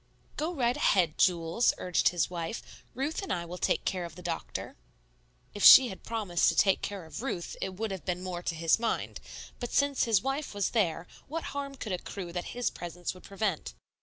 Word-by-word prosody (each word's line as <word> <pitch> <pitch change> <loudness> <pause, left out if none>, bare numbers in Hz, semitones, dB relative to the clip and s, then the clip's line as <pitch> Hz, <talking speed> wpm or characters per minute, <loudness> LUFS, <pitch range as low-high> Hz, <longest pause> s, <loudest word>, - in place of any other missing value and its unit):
"Go 315 +3 -1
right 245 -3 +1
ahead, 170 -5 +2
Jules" 170 +5 +3
urged 180 - +2
his 175 -2 0
wife; 170 +3 -6
"Ruth 280 - -2
and 390 - -5
I 170 -1 -1
will 175 +1 -7
take - - +1
care 185 -2 -1
of 170 -2 -8
the 180 - -11
doctor." 170 -1 -4 0.8
If 205 - -4
she 260 -2 +11
had 190 - -9
promised 210 -7 +1
to - - -1
take 195 -2 +4
care 200 -4 -5
of 160 - -7
Ruth, 185 -10 -4
it 190 -1 -3
would 220 +2 -3
have 190 -2 -5
been 180 -1 -2
more 180 -2 -4
to 170 - -3
his 165 +5 +3
mind; 230 -1 -2 0.4
but 245 - -4
since 280 -1 +2
his 225 -4 +4
wife 270 -3 -2
was 200 -2 0
there, 175 -7 +1 0.2
what 325 +3 -4
harm 280 -1 -4
could 220 -5 -6
accrue 180 -1 -5
that 175 0 -3
his 245 - 0
presence 175 0 -5
would 185 - -14
prevent? 195 - -2
190 Hz, 205 wpm, -30 LUFS, 175-235 Hz, 0.8 s, she